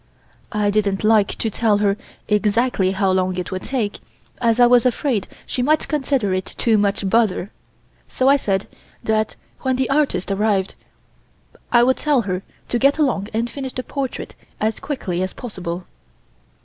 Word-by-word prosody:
I 210 -2 +1
didn't 200 -2 0
like 215 -2 +3
to 225 - -2
tell 215 -1 +2
her 205 -1 +2 0.3
exactly 210 -1 +2
how 195 -1 +1
long 185 -1 +1
it 180 +1 -4
would 185 0 -3
take, 235 -6 -2 0.4
as 230 0 +2
I 245 - +8
was 240 -1 +5
afraid 250 -3 0 0.2
she 250 - -2
might 305 +4 +2
consider 270 - 0
it 185 0 -3
too 225 -3 +3
much 200 0 0
bother, 210 -2 +1 0.6
so 260 - 0
I 275 - +7
said 195 -8 0 0.4
that 220 0 0 0.2
when 260 -1 0
the 260 +1 0
artist 275 -10 +1
arrived 195 -1 +1 1.0
I 240 0 +6
would 260 +1 +3
tell 290 -4 +2
her 185 -2 -2 0.3
to 240 - 0
get 275 +3 +4
along 255 -10 +1
and 230 +2 0
finish 265 +1 -6
the 255 - -4
portrait 270 -1 -4 0.3
as 215 0 0
quickly 190 - -3
as 185 - -2
possible. 185 -7 -6
220 Hz, 165 wpm, -21 LUFS, 195-255 Hz, 1.0 s, I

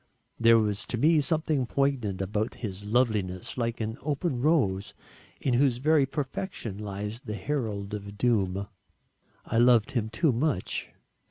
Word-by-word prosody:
There 115 0 +6
was 105 -2 0
to 120 - -2
me 155 +5 +4
something 150 -3 0
poignant 120 -10 0
about 105 +3 -2
his 100 0 -6
loveliness 105 -5 0
like 115 -1 -2
an 110 +1 -3
open 145 -2 -1
rose 115 - +1 0.4
in 130 - 0
whose 125 -1 +3
very 145 +1 +3
perfection 135 - -4
lies 105 +2 -5
the 105 -3 -4
herald 105 -4 -3
of 100 -1 -6
doom. 100 -4 +1 0.8
I 115 - 0
loved 120 +1 +5
him 115 -5 -1
too 150 +6 +2
much. 120 - -1
115 Hz, 145 wpm, -28 LUFS, 105-135 Hz, 0.8 s, There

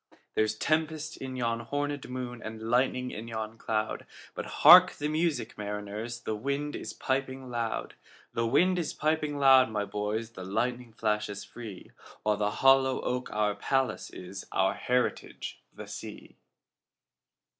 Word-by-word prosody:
There's 110 0 +1
tempest 155 +3 -1
in 130 -1 -6
yon 115 -2 -1
hornèd 145 0 -2
moon, 125 -2 -5
And 110 +1 -6
lightning 125 0 +2
in 110 +2 -6
yon 110 0 -5
cloud:But 110 0 -4
hark 180 +4 +9
the 145 - -3
music, 155 -8 -1
mariners! 105 +3 -4
The 110 - -2
wind 140 +6 -2
is - - -5
piping 130 -1 -2
loud; 115 -2 -2 0.4
The 115 0 0
wind 180 +9 +3
is 165 - -3
piping 155 -1 0
loud, 135 -3 +7
my 105 -2 -1
boys, 105 +3 -3
The 95 - -8
lightning 120 +5 -2
flashes 105 -2 -1
free—While 105 -1 -5
the 105 0 +1 0.2
hollow 135 -1 +6
oak 125 0 -2
our 105 -1 +1
palace 130 +4 -1
is, 95 +2 -8
Our - - +2
heritage 125 0 -2
the - - -9
sea. - - -9
120 Hz, 140 wpm, -29 LUFS, 110-135 Hz, 0.4 s, hark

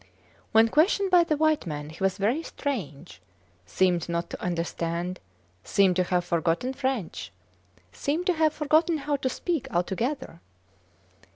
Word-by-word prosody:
When 225 +1 +6
questioned 370 - +2
by 350 -2 +6
the 310 -3 0
white 310 - +2
men 150 -1 -5
he 165 - -7
was 195 -1 +1
very 230 +10 +1
strange, 180 - -5 0.5
seemed 175 - +1
not 170 0 -2
to - - -7
understand, 170 +1 -2 0.4
seemed 195 -2 +3
to 185 - +2
have 180 -1 0
forgotten 170 +8 0
French 260 -9 -3 0.6
seemed 315 +5 -2
to 365 - +3
have 315 -2 +2
forgotten 310 +2 +2
how 290 0 -1
to 260 - -1
speak 335 +1 -2
altogether. 190 - -2
220 Hz, 145 wpm, -26 LUFS, -, 0.6 s, When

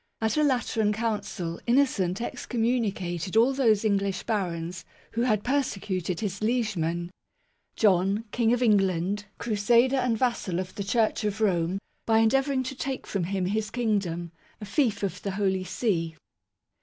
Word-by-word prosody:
At 220 -1 0
a 305 - +3
Lateran 225 -6 +1
Council, 205 -6 -3
Innocent 235 -7 +2
excommunicated 220 -8 -1
all 240 +4 +5
those 225 -6 +3
English 195 -2 0
barons 180 -5 -2 0.3
who 230 - -1
had 215 -4 +2
"persecuted" 195 -10 -1
his 200 -2 -3
liegeman 180 -7 -1 0.6
"John, 195 +1 +3
King 230 0 +2
of 245 +1 +2
England, 195 -2 +2
crusader 235 +4 +3
and 250 -3 +1
vassal 220 -7 0
of 185 0 -5
the 200 - -4
Church 220 +2 +1
of 210 0 -1
Rome, 180 -4 +1 0.3
by 225 -1 +4
endeavouring 265 +4 +3
to 260 - -4
take 265 0 -4
from 190 -4 -2
him 190 0 -1
his 210 +3 -1
Kingdom, 195 -8 -1 0.3
a 210 - -7
fief 210 -1 0
of 185 -2 -2
the 200 - -3
Holy 190 -2 0
See 170 -6 -1
210 Hz, 145 wpm, -27 LUFS, 185-235 Hz, 0.6 s, all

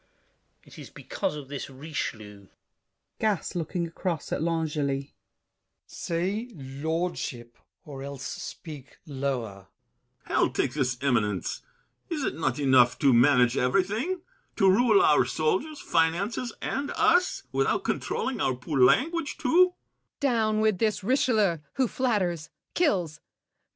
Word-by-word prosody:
It - - -15
is - - -9
because 150 -2 -4
this 140 0 -6
Richelieu— 110 -8 -6 0.7
GASSÉ 215 -5 0
(looking 175 +1 -2
across 165 -1 -4
at - - -1
L'Angely). 150 -4 -1 0.7
Say, 190 +8 -3
lordship, 140 -3 -4 0.3
Or 140 -3 -8
else 140 -1 -7
speak 145 0 -8
lower. 130 - -4 0.6
BRICHANTEAU. - - -7
Hell - - +3
take - - 0
this 125 -4 0
eminence! 105 -8 0 0.5
Is't 305 -6 -1
not 135 -6 -1
enough 130 -4 +4
to 140 -3 +4
manage 125 0 +5
everything? 210 - 0 0.3
To 195 - +3
rule 245 - +5
our 390 - +5
soldiers, 315 -9 -1
finances, 190 +9 0
and 280 +2 -2
us, 360 +2 +3
Without - - +1
controlling 260 -1 -2
our 130 - +1
poor 135 +3 -3
language 290 - +2
too? 350 +5 +4
155 Hz, 100 wpm, -27 LUFS, 130-210 Hz, 0.7 s, manage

